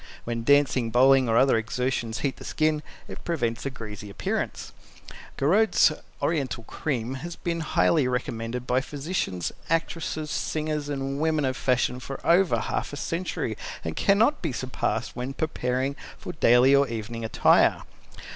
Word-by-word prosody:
When 115 Hz, -1 st, -3 dB
dancing, 140 Hz, -3 st, +3 dB
bowling 130 Hz, +1 st, +5 dB
or 115 Hz, -, +3 dB
other 130 Hz, -2 st, +5 dB
exertions 115 Hz, 0 st, -2 dB
heat 140 Hz, -2 st, -1 dB
the -, -, -10 dB
skin, 155 Hz, -1 st, 0 dB, 0.3 s
it -, -, -9 dB
prevents 120 Hz, -8 st, -1 dB
a -, -, 0 dB
greasy 105 Hz, -5 st, -8 dB
appearance. 100 Hz, -, -3 dB, 0.6 s
Gouraud's 195 Hz, +4 st, +4 dB, 0.3 s
Oriental 135 Hz, -7 st, -1 dB
Cream 125 Hz, -1 st, -3 dB
has 170 Hz, 0 st, -6 dB
been 170 Hz, -1 st, -3 dB
highly 155 Hz, -2 st, +2 dB
recommended 125 Hz, -1 st, -3 dB
by 125 Hz, +1 st, +2 dB
physicians, 140 Hz, -, -3 dB, 0.2 s
actresses, 160 Hz, -1 st, -1 dB
singers 150 Hz, -1 st, -2 dB
and 135 Hz, -1 st, -3 dB
women 155 Hz, -2 st, +1 dB
of 130 Hz, 0 st, -1 dB
fashion 125 Hz, -1 st, +1 dB
for 135 Hz, +1 st, -7 dB
over 180 Hz, +1 st, +4 dB
half -, -, -3 dB
a -, -, -5 dB
century 165 Hz, -9 st, -3 dB, 0.3 s
and 80 Hz, -1 st, -4 dB
cannot 220 Hz, +9 st, +3 dB
be 160 Hz, -, -1 dB
surpassed 125 Hz, -2 st, -2 dB
when 125 Hz, +2 st, -4 dB
preparing 130 Hz, -3 st, -1 dB, 0.2 s
for 180 Hz, -, -7 dB
daily 125 Hz, -3 st, +5 dB
or 140 Hz, 0 st, +4 dB
evening 115 Hz, 0 st, -5 dB
attire. 110 Hz, -, +3 dB
135 Hz, 145 wpm, -26 LUFS, 120-155 Hz, 0.6 s, bowling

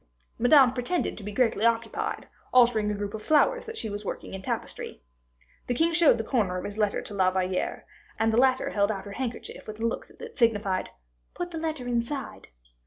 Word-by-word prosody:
Madame 255 Hz, 0 st, +6 dB
pretended 255 Hz, +8 st, -1 dB
to 210 Hz, -, -9 dB
be 210 Hz, -, -5 dB
greatly 225 Hz, -2 st, +1 dB
occupied, 230 Hz, 0 st, 0 dB, 0.2 s
altering 235 Hz, -4 st, +4 dB
a 210 Hz, -, -1 dB
group 205 Hz, 0 st, -4 dB
of 220 Hz, -, -5 dB
flowers 480 Hz, -, +3 dB
that 455 Hz, 0 st, -6 dB
she -, -, -3 dB
was 205 Hz, 0 st, -5 dB
working 195 Hz, -, -6 dB
in 190 Hz, -, -5 dB
tapestry. -, -, -4 dB, 0.6 s
The 245 Hz, -, 0 dB
king 330 Hz, +5 st, +2 dB
showed 315 Hz, -5 st, +5 dB
the 225 Hz, -, -2 dB
corner 210 Hz, -6 st, 0 dB
of 180 Hz, -, -4 dB
his 205 Hz, +1 st, -6 dB
letter 210 Hz, -1 st, +1 dB
to -, -, -8 dB
La 190 Hz, -2 st, +3 dB
Valliere, 185 Hz, 0 st, -2 dB, 0.3 s
and 225 Hz, 0 st, +2 dB
the -, -, +2 dB
latter 260 Hz, -1 st, +2 dB
held 200 Hz, +1 st, +2 dB
out 195 Hz, -2 st, -5 dB
her 200 Hz, -, -8 dB
handkerchief 240 Hz, +2 st, -5 dB
with 215 Hz, 0 st, -7 dB
a 230 Hz, -, -1 dB
look 230 Hz, -, -2 dB
that 470 Hz, -6 st, -11 dB
signified, 205 Hz, -5 st, +1 dB, 0.5 s
"Put 350 Hz, 0 st, -4 dB
the 325 Hz, -, -4 dB
letter 315 Hz, -5 st, -3 dB
inside." 245 Hz, +3 st, -3 dB
230 Hz, 205 wpm, -27 LUFS, 205-265 Hz, 0.6 s, Madame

